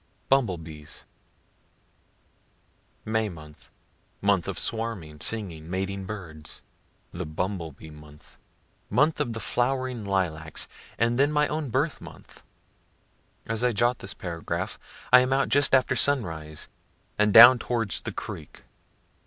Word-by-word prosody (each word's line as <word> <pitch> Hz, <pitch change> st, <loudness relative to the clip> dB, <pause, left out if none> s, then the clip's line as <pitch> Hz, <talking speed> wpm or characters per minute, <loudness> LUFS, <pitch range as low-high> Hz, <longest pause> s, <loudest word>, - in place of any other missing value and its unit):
BUMBLE 120 Hz, -10 st, +3 dB
BEES 80 Hz, -2 st, -10 dB, 2.0 s
May 110 Hz, 0 st, 0 dB
month 75 Hz, -4 st, -13 dB, 0.5 s
month 100 Hz, -3 st, +2 dB
of 100 Hz, -4 st, -4 dB
swarming, 105 Hz, -11 st, -3 dB
singing, 85 Hz, -5 st, -3 dB
mating 95 Hz, +1 st, -3 dB
birds 85 Hz, -7 st, -8 dB, 0.5 s
the 85 Hz, -1 st, -5 dB
bumble 85 Hz, +1 st, -3 dB
bee 80 Hz, +3 st, -13 dB
month 75 Hz, 0 st, -15 dB, 0.5 s
month 155 Hz, +2 st, +2 dB
of 120 Hz, -, -1 dB
the 115 Hz, -, -4 dB
flowering 125 Hz, +1 st, -1 dB
lilac 85 Hz, -6 st, -2 dB, 0.4 s
(and 115 Hz, +2 st, +1 dB
then 140 Hz, +2 st, +4 dB
my 150 Hz, 0 st, +2 dB
own 155 Hz, -2 st, -2 dB
birth 140 Hz, +7 st, -1 dB
month.) -, -, -13 dB, 1.0 s
As 115 Hz, +1 st, -2 dB
I 125 Hz, -1 st, +2 dB
jot 120 Hz, +4 st, +1 dB
this 95 Hz, -, -8 dB
paragraph, 85 Hz, -2 st, -4 dB, 0.3 s
I 125 Hz, -, +11 dB
am 130 Hz, +1 st, +1 dB
out 135 Hz, +1 st, +2 dB
just 140 Hz, -1 st, +4 dB
after 130 Hz, -, +2 dB
sunrise, 80 Hz, -, -1 dB, 0.5 s
and 105 Hz, 0 st, +4 dB
down 120 Hz, +4 st, +10 dB
towards 115 Hz, -4 st, -1 dB
the -, -, -5 dB
creek. 75 Hz, -3 st, -8 dB
100 Hz, 130 wpm, -26 LUFS, 80-125 Hz, 2.0 s, I